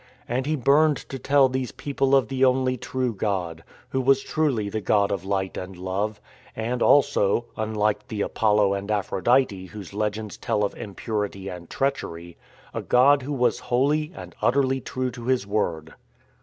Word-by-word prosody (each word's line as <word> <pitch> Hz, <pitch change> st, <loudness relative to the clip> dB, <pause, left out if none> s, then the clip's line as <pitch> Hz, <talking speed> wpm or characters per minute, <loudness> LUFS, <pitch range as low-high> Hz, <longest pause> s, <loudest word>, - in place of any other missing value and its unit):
And 130 Hz, +3 st, -1 dB
he 155 Hz, -, +1 dB
burned 145 Hz, +3 st, +4 dB
to 135 Hz, -, -5 dB
tell 140 Hz, +1 st, +4 dB
these 130 Hz, -1 st, -3 dB
people 140 Hz, -1 st, 0 dB
of 135 Hz, -5 st, +3 dB
the 135 Hz, +1 st, -1 dB
only 130 Hz, 0 st, +3 dB
true 125 Hz, 0 st, -2 dB
God, 90 Hz, -5 st, -2 dB, 0.3 s
Who 130 Hz, -, 0 dB
was 135 Hz, +1 st, +3 dB
truly 140 Hz, -10 st, 0 dB
the 110 Hz, +2 st, -3 dB
God 100 Hz, 0 st, +2 dB
of 95 Hz, -3 st, -2 dB
Light 95 Hz, -1 st, -2 dB
and 90 Hz, 0 st, -7 dB
Love, 100 Hz, +4 st, -2 dB, 0.4 s
and 120 Hz, +2 st, -2 dB
also 120 Hz, -5 st, +3 dB
(unlike 105 Hz, -1 st, -1 dB
the 105 Hz, -2 st, -4 dB
Apollo 105 Hz, -2 st, +2 dB
and 100 Hz, +1 st, -4 dB
Aphrodite 105 Hz, 0 st, +1 dB
whose 100 Hz, -1 st, -10 dB
legends 105 Hz, 0 st, -3 dB
tell 105 Hz, -, 0 dB
of 100 Hz, -, -1 dB
impurity 100 Hz, -2 st, -4 dB
and 85 Hz, -2 st, -9 dB
treachery) 85 Hz, -11 st, -3 dB, 0.4 s
a -, -, -3 dB
God 135 Hz, +3 st, +4 dB
who 135 Hz, +3 st, -5 dB
was 125 Hz, -3 st, +1 dB
holy 150 Hz, +5 st, +2 dB
and -, -, -9 dB
utterly 135 Hz, 0 st, +2 dB
true 130 Hz, +1 st, -3 dB
to 120 Hz, -1 st, -9 dB
His 130 Hz, -5 st, +1 dB
word. 85 Hz, -6 st, -2 dB
110 Hz, 170 wpm, -24 LUFS, 100-130 Hz, 0.4 s, burned